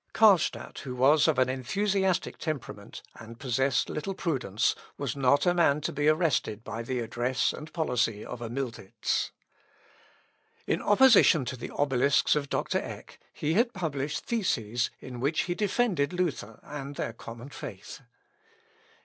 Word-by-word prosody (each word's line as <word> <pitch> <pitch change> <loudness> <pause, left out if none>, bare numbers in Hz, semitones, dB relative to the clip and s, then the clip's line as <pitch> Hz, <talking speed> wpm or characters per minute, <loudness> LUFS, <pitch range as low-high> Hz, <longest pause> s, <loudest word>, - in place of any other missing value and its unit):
Carlstadt, 200 -7 +3
who 130 -3 -6
was 145 +5 +5
of 155 -4 +2
an 130 -1 +4
enthusiastic 190 +8 0
temperament, 155 -6 -6
and 115 +1 -11
possessed 130 0 +1
little 185 +6 -4
prudence, 130 - 0 0.2
was 140 -3 -3
not 140 +1 +3
a 175 - +4
man 160 -4 +3
to - - -2
be 145 +1 0
arrested 155 - +1
by 115 +1 -5
the 125 +2 -3
address 120 +2 0
and 155 0 -9
policy 125 -9 0
of 120 - -7
a 115 - -4
Miltitz. 120 -6 -2 1.4
In - - 0
opposition 205 - +6
to 125 - -4
the 120 - -7
Obelisks 140 0 +2
of 145 -2 -2
Dr. - - 0
Eck, - - -9
he 155 - -2
had 235 +5 +2
published 150 -4 -3
theses 120 - 0
in 125 -2 -8
which 140 +5 +1
he 175 - -2
defended 195 -6 0
Luther 155 - -2
and 145 -1 -7
their 115 - -3
common 115 +3 -10
faith. 100 0 -9
140 Hz, 150 wpm, -28 LUFS, 125-165 Hz, 1.4 s, opposition